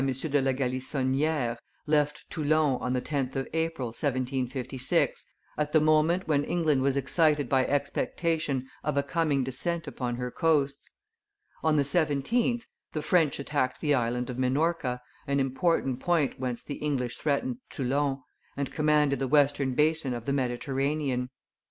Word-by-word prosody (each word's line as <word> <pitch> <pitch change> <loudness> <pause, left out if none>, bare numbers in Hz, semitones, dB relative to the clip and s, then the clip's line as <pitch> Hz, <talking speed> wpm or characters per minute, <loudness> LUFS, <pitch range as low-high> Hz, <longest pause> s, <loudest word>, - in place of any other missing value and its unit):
de 135 +2 0
la 135 0 +2
Galissonniere, 130 0 -1 0.3
left 150 -1 +1
Toulon 150 -4 +1
on 125 +2 -1
the 125 - 0
10th 135 -3 -2
of 135 0 -2
April, 160 -6 -1
1756, 130 0 -1 0.3
at 150 0 -1
the 155 - +6
moment 155 +4 +3
when 145 -2 +2
England 155 -5 +1
was 135 0 +2
excited 150 +2 +2
by 130 -1 +3
expectation 145 -1 -1 0.2
of 150 -1 -1
a 140 - +3
coming 140 -1 +1
descent 165 +6 -1
upon 125 -4 -3
her 125 0 -4
coasts. 150 -4 +1 0.7
On 160 -1 +3
the 145 - +4
17th, 175 - +1 0.3
the 155 - -2
French 165 -4 +3
attacked 140 -2 -1
the 150 -2 +1
Island 125 -1 0
of 125 - -6
Minorca, 130 -1 0 0.3
an 140 0 +1
important 135 -1 +1
point 165 -2 +1
whence 125 -2 -3
the 145 - -6
English 130 -5 -2
threatened 230 - -1
Toulon, 135 0 -1 0.3
and 140 -1 -2
commanded 150 -3 +2
the 135 - -1
western 140 -1 +3
basin 150 -3 +2
of 120 -1 -7
the 140 - 0
Mediterranean. 135 0 -1
140 Hz, 145 wpm, -28 LUFS, 130-155 Hz, 0.7 s, the